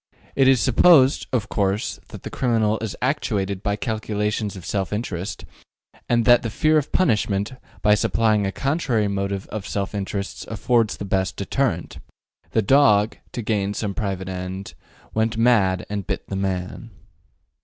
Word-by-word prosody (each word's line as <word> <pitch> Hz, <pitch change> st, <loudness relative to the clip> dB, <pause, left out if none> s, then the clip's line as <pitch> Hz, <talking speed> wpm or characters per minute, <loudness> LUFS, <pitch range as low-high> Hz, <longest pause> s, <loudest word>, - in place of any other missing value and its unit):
'' -, -, -29 dB
It 135 Hz, -1 st, +4 dB
is 130 Hz, -2 st, +5 dB
supposed, 135 Hz, +2 st, +5 dB
of 115 Hz, -4 st, 0 dB
course, 100 Hz, 0 st, -1 dB
that -, -, -11 dB
the -, -, -6 dB
criminal 110 Hz, -4 st, +1 dB
is 110 Hz, -3 st, -4 dB
actuated 100 Hz, -8 st, -1 dB
by 100 Hz, 0 st, 0 dB
calculations 105 Hz, -2 st, -2 dB
of 95 Hz, -, -9 dB
self 95 Hz, -2 st, -2 dB
interest, 100 Hz, -4 st, -4 dB, 0.6 s
and 120 Hz, -1 st, +2 dB
that 120 Hz, -1 st, +6 dB
the 115 Hz, -, -3 dB
fear 155 Hz, +7 st, +3 dB
of 145 Hz, -, -6 dB
punishment, 105 Hz, -, +1 dB, 0.3 s
by 105 Hz, -, +5 dB
supplying 105 Hz, -1 st, +2 dB
a -, -, -2 dB
contrary 135 Hz, -, 0 dB
motive 100 Hz, -1 st, -2 dB
of 105 Hz, -2 st, -5 dB
self 100 Hz, 0 st, -3 dB
interest 100 Hz, 0 st, -4 dB
affords 115 Hz, 0 st, +1 dB
the 100 Hz, -, -5 dB
best 95 Hz, -1 st, -1 dB
deterrent, 100 Hz, -3 st, -2 dB, 0.5 s
The 110 Hz, -, +1 dB
dog, 105 Hz, -3 st, +4 dB, 0.2 s
to 120 Hz, -, -4 dB
gain 105 Hz, -2 st, -1 dB
some 105 Hz, -2 st, -2 dB
private 95 Hz, -2 st, -3 dB
end, 95 Hz, +1 st, -5 dB, 0.4 s
Went 110 Hz, +1 st, 0 dB
mad 110 Hz, -6 st, +3 dB
and 100 Hz, -3 st, -4 dB
bit -, -, -4 dB
the 100 Hz, -, -3 dB
man. 95 Hz, -2 st, -3 dB
105 Hz, 160 wpm, -23 LUFS, 100-115 Hz, 0.6 s, that